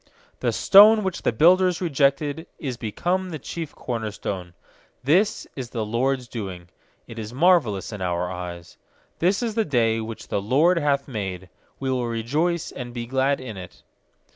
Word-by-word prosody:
stone 210 +2 +7
which 190 -2 -3
the - - +1
builders 180 +7 +4
re 180 - -1
jected 145 +2 +1
Is 130 -4 -4
become 175 - -2
the 160 - -5
chief 160 +2 -7
corner 115 -3 -3
stone. 95 -3 -6 0.5
is 180 +9 +2 0.3
the 115 -3 -2
LORD'S 125 +3 0
doing; 95 -7 -7 0.4
It 115 - -9
is 110 +2 -7
marvellous 140 - +3
in 105 - -7
our 90 -1 -1
eyes. 85 -1 -7 0.4
24This 190 +7 +2
is 230 -2 -1
the 225 0 +1
day 115 -6 +1
which 110 0 -7
the 100 - -1
LORD 150 - +3
hath 140 -2 0
made; 95 -8 -5 0.3
We 135 -1 -1
will 125 -2 -1
rejoice 150 +10 -1
and 120 -1 -8
be 120 -1 -4
glad 135 +3 +1
in 120 -6 -7
it. 90 -1 -11
130 Hz, 165 wpm, -24 LUFS, 110-165 Hz, 0.5 s, stone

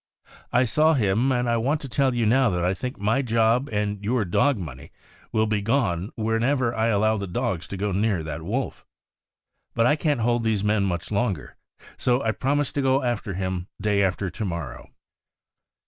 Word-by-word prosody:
I 125 - +4
saw 155 +7 +3
him. 115 +2 +2
and 125 -1 +1
I 115 0 +2
want 140 +7 0
to 140 - -6
tell 130 +1 +1
you 120 -2 +1
now 125 +3 +4
that 90 -2 -1
I 90 - +2
think 125 +6 -5
my 110 +6 +1
job 115 +2 +2
and 105 -1 -2
your 115 +1 +1
dog 135 +9 +2
money 70 -7 -8 0.4
will 110 0 +2
be 105 -1 0
gone 100 -6 0
whenever 115 +3 +1
I 110 0 +1
allow 110 0 +2
the 100 -1 -4
dogs 90 0 -2
to 100 - -6
go 100 +1 -1
near 100 -3 0
that 80 +1 -5
wolf. 115 +11 -3 0.9
But 115 - +3
I 145 - +4
can't 150 -5 0
hold 120 +1 +1
these 110 -3 +1
men 105 -1 +2
much 85 -1 -3
longer, 100 -7 -1 0.4
so 125 +1 +1
I 110 - +2
promised 140 +6 0
to 145 - 0
go 135 0 +2
after 115 -6 -2
him 95 -1 -3
day 105 -1 +1
after 95 -1 0
to - - -5
morrow." 85 -5 -5
110 Hz, 195 wpm, -24 LUFS, 100-125 Hz, 0.9 s, I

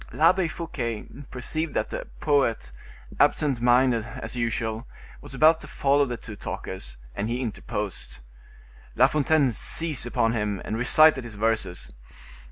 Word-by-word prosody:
L'Abbe 170 +3 +3
Fouquet 125 -9 -4 0.2
perceived 155 +5 -3
that - - -1
the - - -5
poet, 115 - +1 0.5
absent 135 -6 +2
minded, 120 -1 +4
as 120 +3 -7
usual, 115 0 -2 0.3
was - - -10
about 160 +4 +5
to - - -10
follow 140 +1 +2
the 120 -1 -4
two 110 -1 -10
talkers; 65 -11 -6 0.2
and 105 - -3
he 120 +1 -1
interposed. 105 - -4 0.8
La 125 - +6
Fontaine 145 -1 +2
seized 150 +2 +1
upon 115 -1 +1
him, 105 -3 -1
and 110 - -3
recited 135 +3 +5
his 115 -3 -9
verses. 110 -4 -1
120 Hz, 140 wpm, -25 LUFS, 110-145 Hz, 0.8 s, La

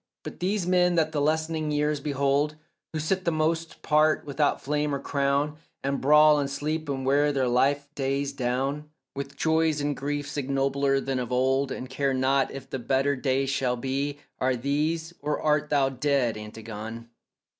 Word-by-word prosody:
But - - -8
these 190 +1 0
men 180 -1 +3
that 160 -2 +2
the 150 -2 -1
lessening 155 +1 0
years 150 0 0
behold, 140 +1 0 0.4
Who 160 - -4
sit 185 +5 -1
the 170 - +1
most 160 +1 -1
part 155 0 +3
without 145 0 +1
flame 150 0 -1
or - - -3
crown, 140 +2 0 0.3
And 140 0 -1
brawl 150 +1 +6
and 140 -1 -1
sleep 150 +2 -3
and 135 -1 -2
wear 145 +2 +3
their 135 -2 +1
life 140 +4 +2
days 140 0 -1
down 135 +3 -2 0.3
With 140 0 -5
joys 160 -1 +2
and 145 0 -1
griefs 145 +1 -3
ignobler 135 0 +1
than 135 -1 -2
of 125 -1 -4
old, 130 +2 +1
And 130 - -5
care 135 +1 -1
not 135 +1 +2
if 135 -1 -8
the 135 - -4
better 135 +3 +1
day 135 0 0
shall 130 -2 0
be— 135 +3 -2 0.2
Are 130 0 +2
these 155 +6 -1
or 150 +1 -1
art 150 -1 +1
thou 140 -2 +3
dead, 135 -3 +1
Antigone? 110 +1 -7
140 Hz, 175 wpm, -26 LUFS, 135-150 Hz, 0.4 s, brawl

